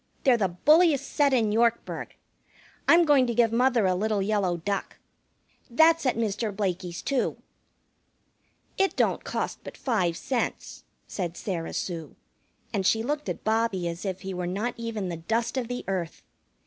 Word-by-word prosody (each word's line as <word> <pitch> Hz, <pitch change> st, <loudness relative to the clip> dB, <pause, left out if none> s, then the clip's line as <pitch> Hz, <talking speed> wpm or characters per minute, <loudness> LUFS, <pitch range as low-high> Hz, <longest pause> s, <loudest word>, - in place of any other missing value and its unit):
They're 260 Hz, -3 st, +5 dB
the 210 Hz, -5 st, +1 dB
bulliest 300 Hz, -, +4 dB
set 285 Hz, -1 st, +3 dB
in 230 Hz, -5 st, +2 dB
Yorkburg. 235 Hz, +1 st, 0 dB, 0.7 s
I'm 340 Hz, 0 st, +6 dB
going 280 Hz, -4 st, +4 dB
to 235 Hz, -, -2 dB
give 230 Hz, -1 st, +4 dB
mother 245 Hz, -2 st, +3 dB
a 185 Hz, -, +3 dB
little 210 Hz, +3 st, 0 dB
yellow 195 Hz, -4 st, 0 dB
duck. 195 Hz, +4 st, -3 dB, 0.7 s
That's 320 Hz, +4 st, +4 dB
at 250 Hz, -, +2 dB
Mr. 215 Hz, -1 st, -1 dB
Blakey's, 185 Hz, -3 st, -3 dB
too." 275 Hz, -3 st, 0 dB, 1.4 s
"It 385 Hz, -2 st, +2 dB
don't -, -, +1 dB
cost -, -, -3 dB
but -, -, -9 dB
five 185 Hz, -10 st, 0 dB
cents," 255 Hz, -3 st, -3 dB, 0.2 s
said 175 Hz, -3 st, -4 dB
Sarah 170 Hz, -5 st, -4 dB
Sue, 165 Hz, -5 st, -4 dB, 0.6 s
and 195 Hz, -, 0 dB
she 225 Hz, +4 st, +2 dB
looked 295 Hz, +4 st, -2 dB
at -, -, -5 dB
Bobbie 220 Hz, -5 st, 0 dB
as 170 Hz, +1 st, -5 dB
if 190 Hz, -2 st, -4 dB
he 190 Hz, 0 st, -5 dB
were 180 Hz, -1 st, -3 dB
not 205 Hz, +7 st, -2 dB
even 225 Hz, -5 st, -4 dB
the 170 Hz, -, -4 dB
dust 225 Hz, +10 st, -1 dB
of 255 Hz, -3 st, -2 dB
the 245 Hz, +1 st, -5 dB
earth. 185 Hz, -4 st, -3 dB
220 Hz, 160 wpm, -27 LUFS, 185-245 Hz, 1.4 s, I'm